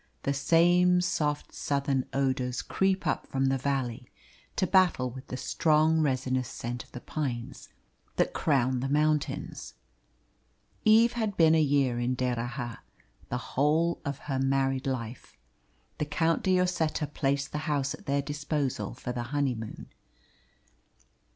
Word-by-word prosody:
The 140 Hz, -, +1 dB
same 175 Hz, +5 st, +4 dB
soft 150 Hz, -4 st, -1 dB
Southern 140 Hz, -2 st, 0 dB
odours 130 Hz, -2 st, 0 dB
creep 190 Hz, 0 st, 0 dB
up -, -, -1 dB
from 135 Hz, 0 st, 0 dB
the 135 Hz, -, +1 dB
valley 130 Hz, -2 st, -2 dB, 0.5 s
to 185 Hz, -, +2 dB
battle 180 Hz, -10 st, +3 dB
with 130 Hz, +2 st, -10 dB
the 130 Hz, -, -5 dB
strong 155 Hz, +3 st, +2 dB
resinous 130 Hz, -3 st, 0 dB
scent 120 Hz, -1 st, -5 dB
of -, -, -24 dB
the 125 Hz, -, -7 dB
pines 130 Hz, -3 st, -4 dB, 0.5 s
that -, -, +1 dB
crown 130 Hz, -4 st, +1 dB
the 135 Hz, +2 st, -2 dB
mountains. 150 Hz, +1 st, -1 dB, 1.1 s
Eve 225 Hz, +2 st, +6 dB
had 220 Hz, -4 st, -2 dB
been 160 Hz, -1 st, +6 dB
a 160 Hz, -, +4 dB
year 140 Hz, -4 st, +2 dB
in 125 Hz, +1 st, 0 dB
D'Erraha 120 Hz, -1 st, -3 dB, 0.5 s
the 125 Hz, -, -1 dB, 0.2 s
whole 155 Hz, +5 st, +2 dB
of 140 Hz, -2 st, -3 dB
her 135 Hz, -3 st, -1 dB
married 135 Hz, 0 st, +1 dB
life. 120 Hz, -, -5 dB, 0.6 s
The 150 Hz, -, 0 dB
Count 160 Hz, +3 st, +1 dB
de 185 Hz, -1 st, +3 dB
Lloseta 165 Hz, -4 st, 0 dB
placed 140 Hz, -1 st, -1 dB
the 150 Hz, -, -2 dB
house 140 Hz, -2 st, 0 dB
at -, -, -12 dB
their 140 Hz, 0 st, +1 dB
disposal 145 Hz, -3 st, -2 dB
for 125 Hz, 0 st, -5 dB
the 125 Hz, -1 st, -3 dB
honeymoon. 130 Hz, -6 st, -2 dB
140 Hz, 140 wpm, -29 LUFS, 130-155 Hz, 1.1 s, Eve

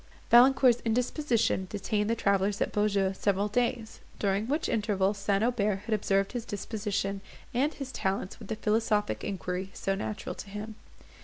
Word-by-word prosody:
Valancourt's 250 Hz, 0 st, +6 dB
indisposition 235 Hz, -3 st, +1 dB
detained 210 Hz, +1 st, -1 dB
the 230 Hz, -, +2 dB
travellers 200 Hz, -1 st, +1 dB
at -, -, 0 dB
Beaujeu 200 Hz, -2 st, +1 dB
several 200 Hz, +1 st, 0 dB
days, 235 Hz, +1 st, -1 dB, 0.2 s
during 200 Hz, +2 st, 0 dB
which 295 Hz, +5 st, 0 dB
interval 205 Hz, -3 st, +1 dB
St. 200 Hz, 0 st, 0 dB
Aubert 210 Hz, -5 st, +1 dB
had 230 Hz, -, -1 dB
observed 195 Hz, -1 st, +1 dB
his 245 Hz, -2 st, -3 dB
disposition 205 Hz, -2 st, -3 dB, 0.3 s
and 275 Hz, +6 st, +1 dB
his 275 Hz, -3 st, -6 dB
talents 190 Hz, -2 st, -2 dB
with 215 Hz, -, -10 dB
the 220 Hz, -, -2 dB
philosophic 215 Hz, -1 st, 0 dB
inquiry 185 Hz, 0 st, -3 dB
so 195 Hz, -, -1 dB
natural 205 Hz, +2 st, -4 dB
to 200 Hz, -, -9 dB
him. 210 Hz, +2 st, -6 dB
210 Hz, 155 wpm, -29 LUFS, 195-230 Hz, 0.3 s, Valancourt's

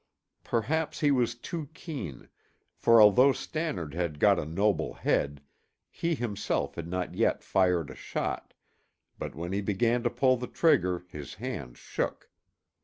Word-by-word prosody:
Perhaps 150 Hz, +8 st, -1 dB
he 145 Hz, -2 st, +4 dB
was 120 Hz, -3 st, +2 dB
too 150 Hz, +4 st, -6 dB
keen, 110 Hz, -, -7 dB, 0.5 s
for 115 Hz, 0 st, +5 dB
although 115 Hz, +6 st, +7 dB
Stannard 140 Hz, -, -3 dB
had 85 Hz, -3 st, -2 dB
got 100 Hz, -1 st, +5 dB
a -, -, -3 dB
noble 100 Hz, +7 st, 0 dB
head, 70 Hz, 0 st, 0 dB, 0.5 s
he 170 Hz, 0 st, -1 dB
himself 105 Hz, -, -2 dB
had 85 Hz, +2 st, -6 dB
not 90 Hz, +1 st, -3 dB
yet -, -, +1 dB
fired 90 Hz, -5 st, +2 dB
a -, -, -10 dB
shot, -, -, -4 dB, 0.6 s
but -, -, -5 dB
when 85 Hz, +3 st, -5 dB
he 100 Hz, -, 0 dB
began 115 Hz, +4 st, +1 dB
to 120 Hz, -, +1 dB
pull 130 Hz, +2 st, +3 dB
the 125 Hz, +1 st, -5 dB
trigger 90 Hz, -, +2 dB
his 75 Hz, +3 st, -8 dB
hand 105 Hz, -, -6 dB
shook. -, -, -4 dB
105 Hz, 150 wpm, -29 LUFS, 85-125 Hz, 0.6 s, although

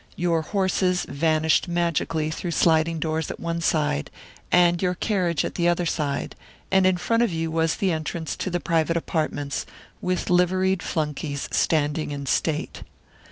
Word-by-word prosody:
Your 170 Hz, -2 st, +1 dB
horses 185 Hz, 0 st, 0 dB
vanished 155 Hz, +3 st, +2 dB
magically 165 Hz, -2 st, 0 dB
through 175 Hz, +2 st, -4 dB
sliding 165 Hz, 0 st, +3 dB
doors 160 Hz, 0 st, -2 dB
at -, -, -6 dB
one 170 Hz, 0 st, -3 dB
side, 150 Hz, -, 0 dB, 0.4 s
and 175 Hz, -1 st, +4 dB
your 180 Hz, -1 st, +1 dB
carriage 180 Hz, -5 st, 0 dB
at -, -, -4 dB
the 170 Hz, -1 st, +1 dB
other 175 Hz, 0 st, +2 dB
side, 145 Hz, -4 st, -2 dB, 0.4 s
and 190 Hz, -1 st, +5 dB
in 185 Hz, -1 st, +2 dB
front 230 Hz, +6 st, +1 dB
of 235 Hz, -5 st, +2 dB
you 165 Hz, -1 st, -2 dB
was 165 Hz, 0 st, +1 dB
the 190 Hz, -2 st, 0 dB
entrance 160 Hz, 0 st, -3 dB
to -, -, -2 dB
the 175 Hz, -1 st, -1 dB
private 165 Hz, 0 st, +1 dB
apartments, 155 Hz, -4 st, -2 dB, 0.4 s
with 180 Hz, -1 st, -1 dB
liveried 185 Hz, +1 st, +2 dB
flunkies 150 Hz, -2 st, -3 dB
standing 155 Hz, -1 st, +1 dB
in 140 Hz, -1 st, -5 dB
state. 150 Hz, +3 st, -1 dB
165 Hz, 160 wpm, -24 LUFS, 155-180 Hz, 0.4 s, and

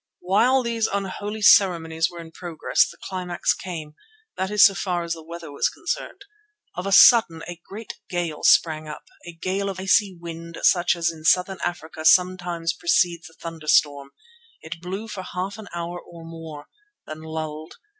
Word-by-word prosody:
While 245 Hz, +8 st, +3 dB
these 230 Hz, -2 st, 0 dB
unholy 205 Hz, +2 st, -4 dB
ceremonies 165 Hz, -5 st, +4 dB
were 175 Hz, -, -11 dB
in 165 Hz, -1 st, -12 dB
progress 170 Hz, -1 st, 0 dB
the -, -, -13 dB
climax 180 Hz, -2 st, -1 dB
came, 160 Hz, -5 st, -7 dB, 0.4 s
that 190 Hz, -, -2 dB
is 210 Hz, -2 st, +6 dB
so 200 Hz, -, +5 dB
far 180 Hz, -3 st, -2 dB
as 170 Hz, 0 st, -2 dB
the 165 Hz, -, -9 dB
weather 165 Hz, -1 st, -9 dB
was 140 Hz, -, 0 dB
concerned. 360 Hz, +3 st, -5 dB, 0.5 s
Of 180 Hz, +2 st, -5 dB
a -, -, -2 dB
sudden 190 Hz, -6 st, +6 dB
a 175 Hz, -1 st, -8 dB
great 215 Hz, +2 st, -9 dB
gale 170 Hz, -4 st, -3 dB
sprang 155 Hz, -2 st, +3 dB
up, 150 Hz, -, -8 dB, 0.2 s
a 175 Hz, -, -8 dB
gale 190 Hz, +4 st, -2 dB
of 190 Hz, -1 st, -6 dB
icy 190 Hz, 0 st, +2 dB
wind 170 Hz, 0 st, -8 dB
such 175 Hz, -1 st, +4 dB
as 170 Hz, -1 st, 0 dB
in 160 Hz, -1 st, -13 dB
Southern 180 Hz, +3 st, +2 dB
Africa 160 Hz, -2 st, -5 dB
sometimes 175 Hz, -1 st, +2 dB
precedes 175 Hz, -, +1 dB
a 165 Hz, -, -22 dB
thunderstorm. 155 Hz, -3 st, 0 dB, 0.5 s
It 160 Hz, +1 st, -9 dB
blew 190 Hz, +5 st, -5 dB
for 210 Hz, -3 st, -6 dB
half 185 Hz, +3 st, -5 dB
an 215 Hz, -, -10 dB
hour 170 Hz, +1 st, -5 dB
or 165 Hz, -1 st, -13 dB
more, 165 Hz, -3 st, -9 dB, 0.4 s
then 155 Hz, 0 st, -8 dB
lulled. 155 Hz, 0 st, -6 dB
175 Hz, 170 wpm, -23 LUFS, 165-195 Hz, 0.5 s, is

